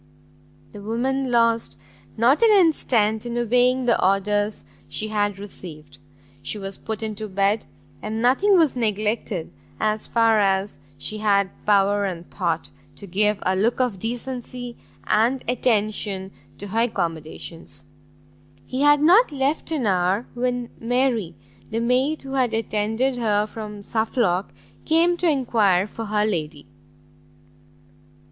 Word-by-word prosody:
The 205 - -10
woman 255 +5 -1
lost 230 -1 +2 0.4
not 245 - +4
an 460 - +6
instant 250 - +3
in 240 0 -4
obeying 250 +2 +2
the 235 - +2
orders 205 +2 +1 0.3
she 215 - 0
had 205 -2 0
received; 155 -8 -10 0.4
she 140 +9 -4
was 195 -1 -6
put 220 0 -5
into 215 0 -4
bed, 200 +3 +1 0.4
and 215 +1 -4
nothing 275 - +4
was 315 -6 +3
neglected, 215 -5 -2 0.3
as 215 0 -1
far 225 -2 +3
as 195 -4 0 0.2
she 215 +10 -4
had 200 -2 +2 0.2
power 205 0 +3
and 175 -3 -5
thought, 170 -4 -2 0.2
to 200 - -9
give 210 +3 +1
a 185 - +1
look 220 +7 +1
of 245 -7 0
decency 245 +1 -5 0.3
and 235 +5 +2
attention 210 -5 0 0.3
to 205 - -8
her 220 +4 -1
accommodations. 165 -8 -3 0.8
He 255 - -3
had 290 0 +5
not 370 +7 +6
left 280 +3 -1
them 315 -4 -1
an - - -1
hour, 190 +3 +1
when 245 -1 -2
Mary, 240 -5 0 0.3
the 225 - -2
maid 255 +6 +1
who 270 - -8
had 255 -4 +1
attended 225 +4 0
her 210 -3 +1
from 210 -2 -8
Suffolk, 220 -4 0 0.4
came 335 +2 +3
to 350 -1 +1
enquire 220 - +2
for 225 +2 -7
her 210 0 +1
lady. 155 -7 -3
220 Hz, 135 wpm, -23 LUFS, 200-245 Hz, 0.8 s, an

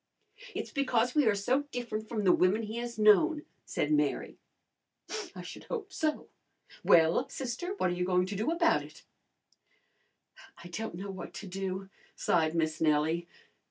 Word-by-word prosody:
"It's - - -4
because 250 -4 +1
we 295 -5 +4
are 210 - +4
so 255 +8 +1
different 220 -3 -4
from 215 -3 -2
the 185 - +6
women 190 +6 +3
he 220 +2 -5
has 235 -1 -4
known," 295 +9 +5 0.2
said - - -1
Mary. 300 0 0 1.0
"I - - -7
should - - -9
hope 420 -5 -5
so! 310 -1 -1 0.6
Well, 165 +10 +5
sister, 270 +10 -4
what 185 - +1
are - - -1
you 180 - -1
going 180 0 +2
to 195 +2 -5
do 215 +8 0
about 335 0 +3
it?" - - -13 1.6
"I 175 - -9
don't 200 +2 -4
know 195 +3 -5
what 190 -2 -8
to 210 - -7
do," 190 +1 -4 0.2
sighed 160 -1 +1
Miss 155 -1 0
Nellie. 160 +2 +2
210 Hz, 160 wpm, -31 LUFS, 180-255 Hz, 1.6 s, the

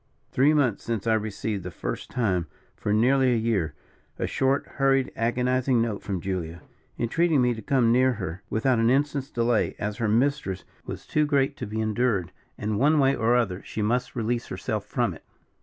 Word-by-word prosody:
Three 135 +4 +4
months 125 -8 +1
since 115 -4 -3
I 115 - +3
received, 110 -1 -2
the 90 - -5
first 85 - -5
time 95 -9 0 0.3
for 105 - -3
nearly 130 +4 +4
a - - +2
year, 100 -9 0 0.4
a - - -1
short, 135 +1 +1
hurried, 135 -1 +1
agonizing 125 +2 +1
note 115 -3 -1
from 95 -3 -3
Julia, 85 -4 -4 0.3
entreating 155 +6 +2
me 125 -1 +3
to 110 - -7
come 125 -4 +2
near 130 +1 +4
her, 95 -4 -5
without 120 +2 +1
an 115 0 +3
instant's 140 +1 +1
delay, 120 -3 +1
as 105 0 -3
her 115 -2 0
mistress 115 -4 0 0.2
was - - -6
too 150 -1 +1
great 140 -1 +2
to 125 - -5
be 110 +1 -4
endured, 110 -4 0 0.3
and 105 -1 -2
one 150 +4 +4
way 135 -1 +4
or 115 +2 +2
other 100 -7 0
she 110 - -4
must 125 +3 0
release 120 0 -1
herself - - -4
from - - 0
it. - - -14
115 Hz, 190 wpm, -26 LUFS, 105-130 Hz, 0.4 s, Three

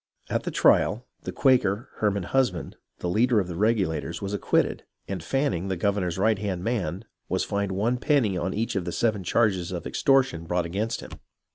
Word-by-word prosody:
At - - -1
the - - -1
trial, 120 +4 +3 0.2
the - - -3
Quaker, 125 -4 +2
Herman 100 -3 0
Husband, 110 -6 0 0.3
the - - -2
leader 115 +5 +3
of 95 - -1
the 85 - -5
Regulators, 95 -6 0
was 100 0 -4
acquitted, 100 - +1 0.2
and 95 -3 -4
Fanning, 95 - 0
the 95 - -1
governor's 95 -2 0
right 110 +1 +2
hand 95 -4 -3
man, 100 -4 -2 0.2
was - - 0
fined 100 -1 -2
one 110 +6 +1
penny 130 -8 +2
on 90 +1 -1
each 115 +4 -2
of 95 -3 -1
the 85 - -3
seven 110 -4 0
charges 95 -2 +1
of 85 -2 -5
extortion 130 -10 +2
brought 90 0 0
against 105 +7 -2
him. - - -10
100 Hz, 185 wpm, -26 LUFS, 90-115 Hz, 0.3 s, trial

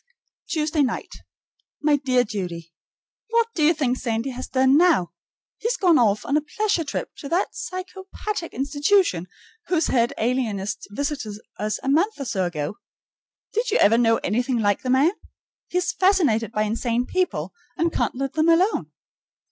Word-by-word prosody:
Tuesday 310 -1 0
night. 265 - -2 0.7
My 295 -1 +3
dear 255 -3 +2
Judy: 175 -6 -5 0.6
What 460 0 +2
do 325 - -2
you 305 - +6
think 275 -6 0
Sandy 230 +2 -2
has 255 +1 -6
done 265 +1 +3
now? 315 - +4 0.5
He - - -2
has - - 0
gone 350 -7 +4
off 215 -3 +2
on 280 - 0
a 305 - +3
pleasure 390 +3 -1
trip 285 - -4
to 280 - -7
that 350 +3 0
psychopathic 375 0 -5
institution 285 - +1 0.4
whose 335 -3 +1
head 235 -2 +3
alienist 220 -4 -1
visited 275 -2 -3 0.2
us 210 0 -1
a - - -5
month 330 +8 +2
or 275 - -3
so 190 -6 -1
ago. 155 +2 -4 0.7
Did 465 +3 0
you - - +2
ever 215 +3 +5
know 225 -1 +4
anything 245 +5 0
like 205 -3 +1
the 255 - -4
man? 270 +6 +4 0.6
He 360 - -2
is 360 0 +1
fascinated 330 - +2
by 215 -1 0
insane 230 +3 -1
people, 370 +4 -1 0.2
and 335 0 +1
can't - - 0
let 275 +1 -3
them 315 +1 +2
alone. 360 +6 +2
275 Hz, 165 wpm, -23 LUFS, 225-340 Hz, 0.7 s, you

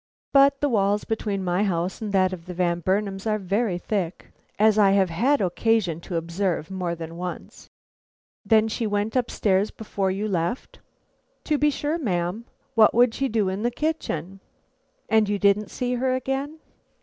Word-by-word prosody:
But 275 0 +5
the 290 - +2
walls 205 -3 +1
between 210 -3 -2
my 180 +1 0
house 180 -1 -1
and 215 -2 -3
that 190 -1 +2
of 175 -1 -9
the 180 - -6
Van 175 -1 0
Burnams 195 +3 -1
are 215 -1 +1
very 200 0 -1
thick, 180 -1 -4 0.3
as 215 0 +4
I 195 -2 +5
have 190 -3 +2
had 255 - +2
occasion 185 -2 +1
to 175 - -6
observe 170 +1 -2
more 180 -3 -2
than 165 0 -8
once. 180 0 -7 0.7
"Then 220 -1 +4
she 225 +1 -2
went 205 +2 -1
up 250 -2 +1
stairs 200 0 +1
before 200 -3 -3
you 200 +3 -2
left?" 185 +5 -3 0.6
"To 300 -2 0
be 295 - +4
sure, 295 +3 -2
ma'am; 185 - -2 0.3
what 220 -3 +5
would 240 -1 +5
she 270 - -1
do 215 -3 +1
in 190 +2 -2
the 240 - +1
kitchen?" 230 - -3 0.7
"And 220 -1 +3
you 205 - +1
didn't 200 +1 +2
see 250 0 -2
her 255 +1 0
again?" 270 +4 -3
205 Hz, 175 wpm, -24 LUFS, 185-230 Hz, 0.7 s, But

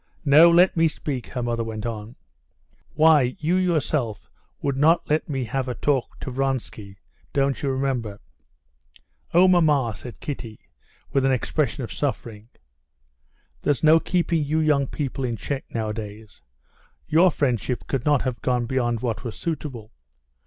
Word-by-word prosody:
"No, 155 +4 +8
let 175 +2 +5
me 165 -1 +4
speak," 140 -5 -4
her 125 - -4
mother 120 -1 -1
went 110 -1 -6
on, 110 0 -5 0.8
"why, 150 -5 +4
you 165 +3 0
yourself 155 - -1 0.3
would 140 -1 -1
not 160 +5 +3
let 155 +1 0
me 135 -3 -2
have 130 +3 -3
a 125 - -3
talk 140 -4 -1
to 130 - -5
Vronsky. 125 -7 -3 0.4
Don't 140 -1 +1
you 140 - -1
remember?" 130 -6 -2 1.1
"Oh, 180 +2 +6
mamma!" 150 -10 +3
said 120 +2 -10
Kitty, 115 -7 -6 0.5
with 135 - +2
an 135 - +3
expression 140 +2 -1
of 115 - -6
suffering. 115 -6 -4 1.1
"There's 145 - 0
no 160 +1 +7
keeping 170 -2 0
you 150 +2 -1
young 150 -3 +2
people 135 -1 -4
in 120 -2 -1
check 135 +8 -4
nowadays.... 110 -1 -6 0.7
Your 170 +4 +5
friendship 125 - -1
could 135 -3 -2
not 145 -3 +2
have 125 -2 -3
gone 125 -2 0
beyond 120 -2 -1
what 115 -7 -3
was 115 - -5
suitable. 140 -9 -5
135 Hz, 150 wpm, -24 LUFS, 115-150 Hz, 1.1 s, No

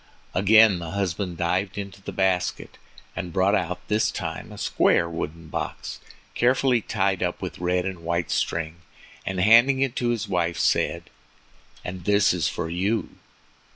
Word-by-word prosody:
Again 100 0 +5
the 85 -1 -6
husband 95 -2 -2
dived 90 +3 -1
into 100 -1 -6
the - - -6
basket, 95 -1 -1 0.4
and 90 - -4
brought 95 +3 +2
out 90 -3 -2
this 105 +1 +2
time - - -5
a - - -10
square 85 - +2
wooden 80 0 -5
box, - - -5 0.3
carefully 125 0 +2
tied 95 -3 0
up 90 -1 -1
with - - -6
red 90 +1 0
and 95 -2 -4
white 85 0 -2
string, 80 0 -1 0.5
and 95 -1 -2
handing 115 +7 +6
it 135 -2 0
to 120 - 0
his 120 -2 -1
wife, 85 -2 0
said: - - 0 0.7
"And 90 -1 -6
this 100 -2 +4
is 85 -6 0
for - - -4
you." 95 +4 -1
95 Hz, 155 wpm, -24 LUFS, 85-105 Hz, 0.7 s, handing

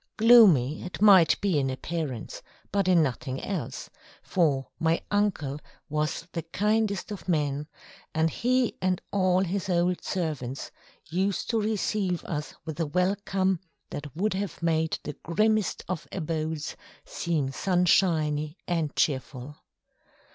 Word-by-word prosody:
Gloomy 205 - +6
it 180 - -7
might 190 -5 +6
be 190 -7 +2
in 135 -1 0
appearance, 130 -2 -4 0.3
but 200 -1 +1
in 175 -3 +5
nothing 130 -1 -3
else, 195 -2 -4 0.4
for 145 -8 +1
my 165 +1 +2
uncle 190 -9 0 0.3
was 150 +2 -1
the 165 - -3
kindest 210 +4 0
of 200 -2 -7
men, 150 -3 0 0.4
and 160 +1 +1
he 250 - +1
and 185 -1 +1
all 185 -2 +3
his 190 +1 -2
old 175 0 +1
servants 145 -8 -3 0.4
used 190 +7 -1
to 225 -2 +1
receive 205 -3 -1
us 150 -2 -4
with 160 0 -6
a 165 - 0
welcome 190 +2 +1 0.3
that 145 -2 -7
would 205 +5 0
have 190 -3 -4
made 160 -1 +1
the 150 - -5
grimmest 215 +4 +1
of 175 -3 -4
abodes 160 -3 -3 0.3
seem 155 -6 -1
sunshiny 160 -3 +2
and 165 -4 -1
cheerful. 135 0 -1
170 Hz, 130 wpm, -27 LUFS, 150-195 Hz, 0.4 s, Gloomy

